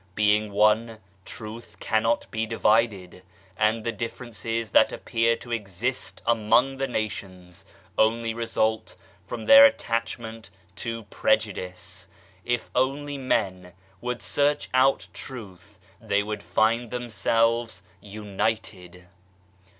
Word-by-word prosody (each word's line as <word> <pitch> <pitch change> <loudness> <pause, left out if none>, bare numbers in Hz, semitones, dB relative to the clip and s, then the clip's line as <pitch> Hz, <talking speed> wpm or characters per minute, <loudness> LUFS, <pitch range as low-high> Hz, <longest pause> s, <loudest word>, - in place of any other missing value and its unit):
Being 105 0 +2
one, 110 +2 +3 0.3
Truth 110 +2 -9
cannot 115 +1 +1
be 110 0 -2
divided, 105 -5 +1 0.3
and 110 +2 +1
the 115 - -1
differences 115 -1 -4
that - - +5
appear 115 0 +1
to 120 - -11
exist 115 +3 -3
among 120 +4 +3
the 135 0 -1
nations 95 -6 -5 0.3
only 115 +1 +2
result 110 -1 -1 0.3
from 115 - -6
their 280 0 +10
attachment 115 - 0 0.3
to 115 -1 -4
prejudice. 90 +1 -1 0.4
If 120 0 -2
only 140 +2 -1
men 95 -8 -1 0.3
would 125 -3 -4
search 145 +10 +1
out 130 -7 +3
Truth, 100 -4 -9 0.2
they 100 0 +1
would 105 0 -4
find 110 +7 +1
themselves 115 -1 0 0.2
united. 100 -3 -4
110 Hz, 105 wpm, -25 LUFS, 100-115 Hz, 0.4 s, their